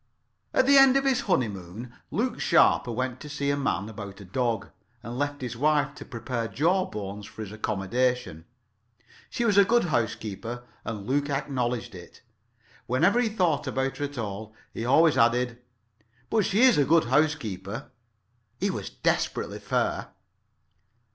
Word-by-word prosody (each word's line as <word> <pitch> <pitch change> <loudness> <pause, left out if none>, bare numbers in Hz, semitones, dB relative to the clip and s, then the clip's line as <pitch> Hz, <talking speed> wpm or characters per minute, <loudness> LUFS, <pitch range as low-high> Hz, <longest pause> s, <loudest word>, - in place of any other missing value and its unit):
At 260 - +3
the 275 +1 +7
end 270 0 +7
of 275 - 0
his 265 -2 +2
honeymoon 110 - -2 0.2
Luke - - -1
Sharper 120 - +4
went 125 +1 -3
to 150 - -9
see 140 -1 -1
a - - +1
man 105 -9 -1
about 105 -3 -8
a 100 - -10
dog, 115 +1 -1 0.3
and 115 +1 -6
left 145 0 -2
his 120 -2 -4
wife 145 +2 +2
to - - -10
prepare 115 0 -4
Jawbones 110 - -1
for 110 - -8
his 100 - -8
accommodation. 110 -3 -1 0.8
She 240 - -1
was 205 -3 +4
a - - +8
good 235 +4 +3
housekeeper, 115 +1 -2 0.2
and 105 -3 -5
Luke 145 +4 0
acknowledged 125 -5 -2
it. 85 -2 -13 0.6
Whenever 165 - +3
he 240 -2 +2
thought 175 -9 0
about 135 +1 -1
her 145 - -1
at 145 -1 -8
all, 110 0 -5 0.2
he 115 - -4
always 160 +5 +4
added 120 +1 +2 0.7
"but 215 -4 +3
she 210 +5 +2
is 255 - +6
a - - +5
good 160 +3 +4
housekeeper." 120 - -1 0.7
He - - +1
was - - -5
desperately - - -1
fair. - - -1
125 Hz, 155 wpm, -27 LUFS, 110-150 Hz, 0.8 s, a